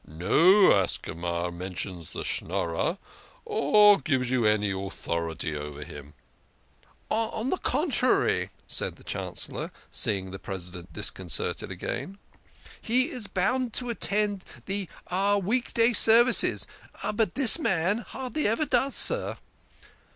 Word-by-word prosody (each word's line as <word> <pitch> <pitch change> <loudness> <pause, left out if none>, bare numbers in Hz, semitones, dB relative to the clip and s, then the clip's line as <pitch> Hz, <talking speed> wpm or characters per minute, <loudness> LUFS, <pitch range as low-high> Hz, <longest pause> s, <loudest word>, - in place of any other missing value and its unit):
No 165 - +4
Ascama 85 -2 -2
mentions 90 -1 -7
the - - -7
Schnorrer, 85 -2 -2 0.5
or 205 +6 +4
gives 130 -3 -2
you 120 -4 +1
any 105 -1 +1
authority 85 -5 -4
over 75 0 -7
him." 75 -1 -12 0.5
" - - -35
On 225 +2 -1
the 370 - 0
contrary," 270 -3 0 0.2
said - - 0
the - - -19
Chancellor, - - -5 0.2
seeing 95 -2 0
the 95 - -8
Presi 95 -3 -5
dent 90 -2 -11
disconcerted 90 -5 0
again, 195 +1 -6 0.3
" - - -27 0.3
he 255 +7 0
is 245 -6 -4
bound 220 +6 -1
to 245 -1 -1
attend 205 -3 -1 0.2
the 195 -2 -3 0.5
week 240 +6 -1
day 230 +1 +3
services. 235 +2 +6 0.5
But 210 -4 -1
this 270 +3 +8
man 190 - 0
hardly 260 +3 -4
ever 230 +8 0
does, 265 0 0
sir." - - +4
185 Hz, 125 wpm, -26 LUFS, -, 0.5 s, this